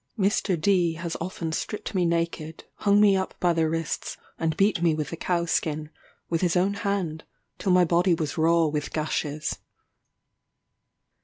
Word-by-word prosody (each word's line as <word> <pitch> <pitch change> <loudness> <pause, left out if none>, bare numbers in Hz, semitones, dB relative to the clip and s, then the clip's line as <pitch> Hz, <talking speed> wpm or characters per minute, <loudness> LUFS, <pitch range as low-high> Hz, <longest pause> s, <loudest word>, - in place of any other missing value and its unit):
Mr. 195 -3 +1
D 175 -1 +2
has 165 0 -5
often 170 -2 -4
stripped 210 +7 -4
me 180 -3 +2
naked, 165 -1 -2
hung 205 0 +3
me 205 -2 +6
up 190 0 -2
by 175 -1 +3
the 165 -1 +1
wrists, 165 0 -3 0.2
and 160 -1 -1
beat 195 -3 +2
me 165 -2 +3
with 150 -2 -3
the - - -3
cow 170 0 -1
skin, 155 -2 -1 0.4
with 165 -1 -1
his 180 -1 +1
own 190 +3 +2
hand, 195 -6 -2 0.4
till 195 - 0
my 180 0 +5
body 175 +1 +3
was 155 -3 -3
raw 165 +1 +3
with 150 -1 -2
gashes. 155 -1 -2
170 Hz, 165 wpm, -26 LUFS, 160-185 Hz, 0.4 s, me